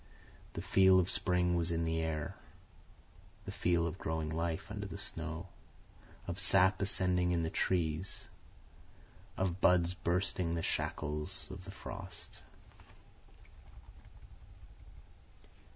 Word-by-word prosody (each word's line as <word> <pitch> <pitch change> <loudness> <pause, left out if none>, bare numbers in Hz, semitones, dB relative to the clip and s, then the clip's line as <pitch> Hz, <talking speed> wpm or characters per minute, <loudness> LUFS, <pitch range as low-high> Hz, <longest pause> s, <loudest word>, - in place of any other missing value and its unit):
The - - -5
feel 95 -1 +6
of 90 0 +1
spring 90 -1 +2
was 85 0 0
in 85 -1 0
the 80 0 0
air, 80 -2 -2 1.1
the - - -5
feel 85 -1 +1
of 85 +3 -4
growing 80 -1 -2
life 85 +4 -2
under 105 -1 -4
the 95 - -7
snow, 80 -4 -4 0.8
of 85 +2 -4
sap 95 +1 +5
ascending 90 -2 +2
in 85 -1 +1
the 80 - -2
trees, 85 0 -1 1.1
of 95 0 -1
buds 90 -1 +4
bursting 90 -1 0
the 80 - -2
shackles 75 0 -2
of - - -9
the - - -9
frost. - - -9
85 Hz, 115 wpm, -34 LUFS, 80-95 Hz, 1.1 s, feel